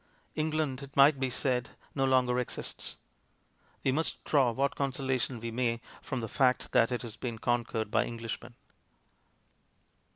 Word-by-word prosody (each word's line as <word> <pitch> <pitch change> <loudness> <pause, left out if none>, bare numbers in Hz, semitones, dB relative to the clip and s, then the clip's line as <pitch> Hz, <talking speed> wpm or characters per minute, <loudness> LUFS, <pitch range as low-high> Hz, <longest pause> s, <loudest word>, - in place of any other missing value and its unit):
England, 155 -3 -1
it 140 0 -10
might 140 0 +7
be 130 -1 +1
said, 125 -1 0 0.2
no 135 -2 +1
longer 125 -2 +3
exists; 125 - -4 0.9
we 135 - +3
must 155 +4 -1
draw 135 -5 +4
what 135 +4 0
consolation 130 -3 -1
we 115 +1 -4
may 115 -1 0 0.2
from 130 - -3
the 115 - -3
fact 130 +2 +2
that 115 0 +4
it 125 - -1
has 115 -3 -7
been 120 -3 -4
conquered 115 -2 -1
by - - +3
Englishmen. 115 +1 -6
125 Hz, 150 wpm, -31 LUFS, 120-135 Hz, 0.9 s, might